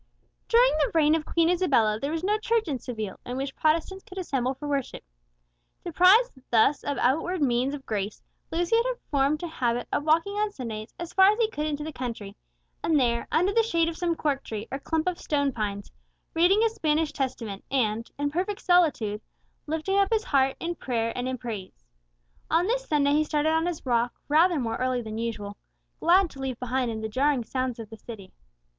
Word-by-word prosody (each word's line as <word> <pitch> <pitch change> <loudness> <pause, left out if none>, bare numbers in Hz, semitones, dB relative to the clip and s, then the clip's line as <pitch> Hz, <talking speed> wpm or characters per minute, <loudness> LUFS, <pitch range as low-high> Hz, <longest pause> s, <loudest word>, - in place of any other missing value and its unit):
During 485 +2 +5
the 295 - +2
reign 305 -1 +5
of 320 -1 -1
Queen 335 -1 +2
Isabella 265 -12 +2
there 280 +5 -2
was 325 +1 -3
no 420 +3 +1
church 455 -2 0
in 275 -5 -2
Seville 220 -6 -6
in 250 +1 -5
which 270 0 -4
Protestants 330 +5 0
could 375 - -13
assemble 270 -8 -1
for 295 +3 -7
worship. 280 -3 -3 0.8
Deprived 370 +8 +5 0.2
thus 240 +5 +3
of 285 - -2
outward 325 +8 +1
means 260 0 +1
of 275 - -11
grace, 205 -1 -3 0.3
Lucius 350 +8 +2
had - - -1 0.2
formed 285 +3 +1
a - - -2
habit 245 -6 -1
of - - +1
walking 325 +6 +2
on 425 0 +1
Sundays 225 - -6
as 340 -1 -7
far 380 0 +7
as 425 - -2
he 450 -2 +1
could 300 +1 -2
into 295 -1 -3
the 310 0 -6
country, 230 -6 -6 0.5
and 315 -3 +3
there, 235 -2 +1
under 365 +5 +2
the 460 - +5
shade 335 -7 +1
of 335 - -6
some 340 0 -1
cork 285 -3 -1
tree, 220 0 -6
or 270 - -3
clump 320 +3 -1
of 360 -1 -1
stone 285 -2 0
pines, 205 -4 -4 0.4
reading 365 +6 +4
his 450 -1 +2
Spanish 310 -4 0
Testament, 230 -8 -4
and, 230 -4 0
in 285 0 -1
perfect 375 +5 -2
solitude, 290 - +2 0.5
lifting 320 +6 0
up 395 -1 +3
his 440 -1 +2
heart 270 -5 +2
in 340 +1 -2
prayer 230 -7 -2
and 250 0 -2
in 260 - -3
praise. 205 - -7 0.6
On 335 +2 +3
this - - -1
Sunday 285 -2 +2
he 305 +1 +3
started 300 0 0
on 320 +1 +1
his 340 -5 -4
walk 240 -1 +1
rather 325 +2 +4
more 230 -3 -2
early 255 -1 -1
than 220 0 -5
usual, 210 -3 -4 0.4
glad 355 +1 +4
to 275 - -13
leave 265 -3 -4
behind 250 0 -1
him 220 -1 -4
the 220 - -2
jarring 265 +3 +1
sounds 255 +1 -2
of 225 -2 -9
the 225 - -9
city. 210 -4 -10
290 Hz, 205 wpm, -26 LUFS, 240-340 Hz, 0.8 s, far